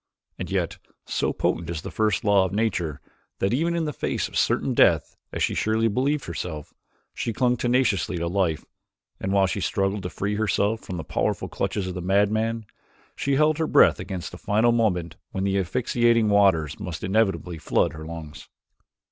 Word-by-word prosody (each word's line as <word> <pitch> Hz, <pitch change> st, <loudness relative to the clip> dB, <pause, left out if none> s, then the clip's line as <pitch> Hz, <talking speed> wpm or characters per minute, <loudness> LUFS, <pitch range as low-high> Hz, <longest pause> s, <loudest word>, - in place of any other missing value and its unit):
And -, -, -4 dB
yet, -, -, -1 dB, 0.3 s
so -, -, 0 dB
potent 85 Hz, 0 st, -1 dB
is 85 Hz, -3 st, -4 dB
the -, -, -6 dB
first 105 Hz, -4 st, +1 dB
law 100 Hz, -2 st, +4 dB
of 95 Hz, -, -2 dB
nature 95 Hz, -8 st, -1 dB, 0.4 s
that 95 Hz, +4 st, 0 dB
even 165 Hz, +6 st, +1 dB
in 165 Hz, -1 st, 0 dB
the 150 Hz, -, -3 dB
face -, -, -2 dB
of -, -, -13 dB
certain -, -, +1 dB
death, -, -, +3 dB, 0.2 s
as -, -, -2 dB
she -, -, +1 dB
surely 110 Hz, +1 st, +1 dB
believed 135 Hz, +7 st, 0 dB
herself, 80 Hz, -3 st, -6 dB, 0.4 s
she 115 Hz, -, -2 dB
clung 125 Hz, +2 st, +2 dB
tenaciously 120 Hz, -7 st, +1 dB
to 85 Hz, -, -2 dB
life, 85 Hz, -3 st, 0 dB, 0.5 s
and 95 Hz, -, -2 dB
while 100 Hz, -1 st, +4 dB
she 95 Hz, +1 st, -2 dB
struggled 95 Hz, +2 st, 0 dB
to 90 Hz, -, -4 dB
free 100 Hz, +3 st, -2 dB
herself 110 Hz, 0 st, +1 dB
from 90 Hz, -, -6 dB
the 80 Hz, -, -4 dB
powerful -, -, -1 dB
clutches 100 Hz, -, -2 dB
of 95 Hz, -, -4 dB
the 90 Hz, -, -5 dB
madman, 110 Hz, +4 st, +1 dB, 0.5 s
she 140 Hz, 0 st, 0 dB
held 150 Hz, +2 st, +3 dB
her 160 Hz, -, +1 dB
breath -, -, +5 dB
against 95 Hz, -4 st, -5 dB
the -, -, -10 dB
final 110 Hz, +3 st, +2 dB
moment 90 Hz, -8 st, 0 dB, 0.2 s
when 95 Hz, -, -2 dB
the 100 Hz, 0 st, +1 dB
asphyxiating 115 Hz, +2 st, +2 dB
waters 95 Hz, -7 st, +3 dB
must 90 Hz, -5 st, -6 dB
inevitably 95 Hz, -4 st, 0 dB
flood -, -, +1 dB
her 80 Hz, -, -8 dB
lungs. 80 Hz, -3 st, -9 dB
100 Hz, 185 wpm, -25 LUFS, 90-115 Hz, 0.5 s, breath